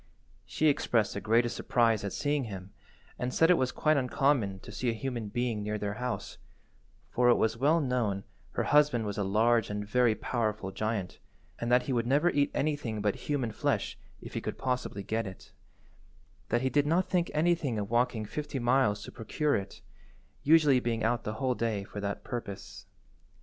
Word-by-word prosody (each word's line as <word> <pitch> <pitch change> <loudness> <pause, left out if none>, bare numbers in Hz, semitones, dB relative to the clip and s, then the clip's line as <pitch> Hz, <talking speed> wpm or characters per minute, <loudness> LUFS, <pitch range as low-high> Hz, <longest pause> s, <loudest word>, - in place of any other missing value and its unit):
She 155 - -1
expressed 115 -7 +2
the 100 - -4
greatest 115 +2 +2
surprise 115 -3 +2
at 100 - -3
seeing 145 -2 0
him, 95 -3 -8 0.5
and 125 +1 -2
said 165 +6 +4
it - - +6
was 130 -4 0
quite 155 -1 +2
uncommon 125 -6 +1
to - - -10
see 125 - -1
a - - +1
human 120 -1 -4
being 120 0 -2
near 105 +1 -2
their 105 -1 -3
house, 125 -1 -4 0.7
for 125 0 +3
it 120 - +6
was 110 0 +1
well 145 +7 +3
known 120 -8 0 0.3
her - - 0
husband 145 -6 +3
was 100 0 -3
a - - +1
large 110 +3 +2
and 105 0 -4
very 120 0 +3
powerful 110 -6 -2
giant, 110 -1 -3 0.4
and 120 0 -2
that 125 0 +5
he 130 - -2
would 120 -1 0
never 145 +7 +3
eat 145 0 +2
anything 145 -7 -1
but 105 -1 +1 0.2
human 130 -6 0
flesh, - - -1 0.2
if - - -10
he - - -2
could - - -4
possibly 125 -6 -2
get 110 +2 -2
it; 95 - -11 1.0
that 120 +1 +1
he 130 - +2
did 145 0 +2
not 175 +4 +2
think 175 -2 +1
anything 155 -6 +1
of 100 0 -3
walking 120 -2 +1
fifty 145 +6 -4
miles 120 -4 +2
to - - -9
procure 145 +6 -1
it, 100 0 -5 0.6
usually 150 -3 +5
being 115 -2 -2
out 120 +2 0
the 105 - -2
whole 130 +3 0
day 115 -4 -1
for 105 - -8
that 100 0 -3
purpose. 115 -6 -7
120 Hz, 190 wpm, -30 LUFS, 105-135 Hz, 1.0 s, it